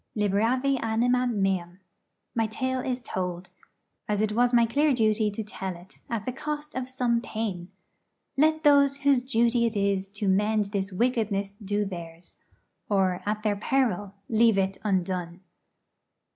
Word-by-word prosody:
'Liberavi 230 +7 +1
animam 245 +2 +1
meam.' 185 -2 -1 0.5
My 225 -1 +1
tale 260 +4 -2
is 250 -1 -3
told, 180 0 -4 0.6
as 210 -1 +1
it 215 0 +1
was 240 +3 +3
my 235 -1 +5
clear 285 +4 +2
duty 215 -2 +2
to 210 +2 -5
tell 190 -3 -5
it, 175 +2 -16
at 225 -3 -3
the 255 - -1
cost 300 +3 -5
of 260 0 -4
some 245 -2 0
pain. 205 -7 -4 0.7
Let 315 +2 +3
those 280 -1 +4
whose 280 -3 +4
duty 235 -1 +2
it 225 - -2
is 200 -1 0
to 205 0 -3
mend 210 +1 +2
this 200 -1 -2
wickedness 205 -2 0
do 205 +1 0
theirs, 170 -2 -8 0.5
or 190 -3 +1
at 210 0 -1
their 210 -2 +1
peril 205 -4 0
leave 225 -2 +4
it 195 0 0
undone. 185 -3 -1
'Mr. - - -22
215 Hz, 155 wpm, -27 LUFS, 195-250 Hz, 0.7 s, my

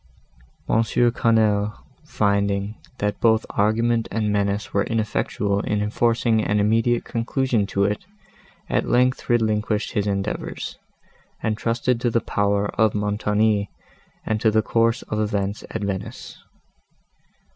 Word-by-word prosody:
M. 115 - +3
Quesnel, 110 -3 +2 0.3
finding, 100 0 0 0.2
that 105 0 -2
both 110 -1 +3
argument 115 +2 +1
and 105 -2 -1
menace 100 0 -1
were 100 - +2
ineffectual 105 -2 -1
in 105 0 -1
enforcing 115 +1 +1
an 105 0 +1
immediate 115 +3 +2
conclusion 115 -2 0
to 100 - 0
it, 105 - -1 0.6
at - - 0
length 125 +2 +2
relinquished 110 -2 +1
his 105 -1 -1
endeavours, 100 +1 -3 0.6
and 110 -1 0
trusted 115 +2 0
to 120 - +2
the 115 - +2
power 100 -1 0
of 110 -1 +3
Montoni 105 0 +1 0.6
and 110 -1 -1
to 110 - +4
the 110 0 +2
course 115 +2 +1
of 105 - -3
events 100 -1 -1
at 110 - -4
Venice. 100 -2 -5
105 Hz, 125 wpm, -23 LUFS, 100-115 Hz, 0.6 s, to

